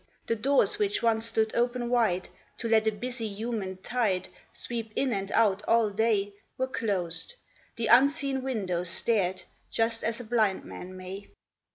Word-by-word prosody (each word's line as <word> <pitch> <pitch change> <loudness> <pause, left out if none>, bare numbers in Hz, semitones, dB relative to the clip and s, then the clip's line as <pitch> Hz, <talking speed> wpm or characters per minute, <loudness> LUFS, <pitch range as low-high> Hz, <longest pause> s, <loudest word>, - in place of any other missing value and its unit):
The 230 - 0
doors 280 - +2
which 410 - 0
once 225 -1 +2
stood 220 -1 +1
open 240 0 0
wide, 225 -7 +2 0.3
To 235 - -3
let 220 -1 +3
a - - +4
busy 240 +2 -4
human 205 -2 -4
tide 210 -7 0 0.2
Sweep 230 -2 -5
in 265 -3 +1
and 195 -1 -3
out 210 -3 +3
all 225 -2 +4
day, 205 -1 +1 0.2
Were 260 - +1
closed; 205 - -1 0.4
the 230 - -2
unseeing 270 +3 +4
windows 190 -9 -2
stared 190 -1 +1 0.3
Just 225 0 0
as 230 +1 -1
a - - -5
blind 220 -4 +1
man 185 +1 -8
may. 190 +2 -8
225 Hz, 160 wpm, -28 LUFS, 200-240 Hz, 0.4 s, a